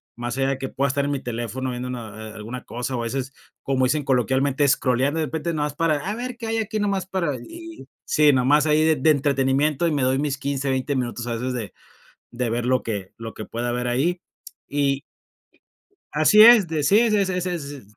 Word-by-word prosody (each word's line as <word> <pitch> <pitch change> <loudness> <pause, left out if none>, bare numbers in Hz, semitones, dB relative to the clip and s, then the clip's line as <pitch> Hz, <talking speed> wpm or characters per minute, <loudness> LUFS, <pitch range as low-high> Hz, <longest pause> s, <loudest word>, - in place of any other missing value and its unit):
más 120 +1 -4
allá 135 0 +1
de 135 - -1
que 135 0 -4
pueda 140 +1 0
estar 140 +1 0
en 145 - -1
mi 140 - -1
teléfono 120 +2 -4
viendo 125 +1 -5
una 120 -3 -5
a 110 +1 -9
a - - -14
alguna 115 +4 -7
cosa 125 +2 -4
o, 120 - -2
a - - -3
veces, 135 +3 -3 0.3
como 130 -1 +1
dicen 145 +3 0
coloquialmente, 135 +2 +1
scrolleando, 135 +4 +1
de 155 - 0
repente, 160 +3 -3
nada 150 -1 0
más 145 - -8
para, 165 -3 +1
a 210 - -2
ver 245 0 -5
qué 230 -2 -6
hay 225 0 -1
aquí 215 0 -2
nomás, 195 -3 0
para 170 -7 -1
y, 335 0 -11 0.2
sí, 150 -2 +4
nomás 145 +4 +3
ahí 155 +1 +3
de 160 -1 +4
de 155 +4 +4
entretenimiento 140 +2 +1
y - - 0
me 145 -2 0
doy 130 +1 +2
mis 145 -2 -1
15 140 0 -2
20 130 +2 -1
minutos, 120 -1 -3
a 115 - -2
veces, 125 +2 -3
de 115 -5 -5 0.6
de 120 -1 -2
ver 120 +1 -1
lo 130 0 +2
que 100 -4 -5
lo 115 -1 -7
que 110 - -7
pueda 120 +1 -3
ver 125 0 -2
ahí. 165 +9 0 0.5
Y 140 -1 0 1.1
Así 155 +8 +6
es, 225 -6 +8
de 155 -2 -1
sí, 200 +10 +5
ese 215 -4 +3
ese 185 -1 -1
ese 180 0 -2
es 155 -5 -5
s, 140 -1 -8
140 Hz, 235 wpm, -23 LUFS, 125-160 Hz, 1.1 s, es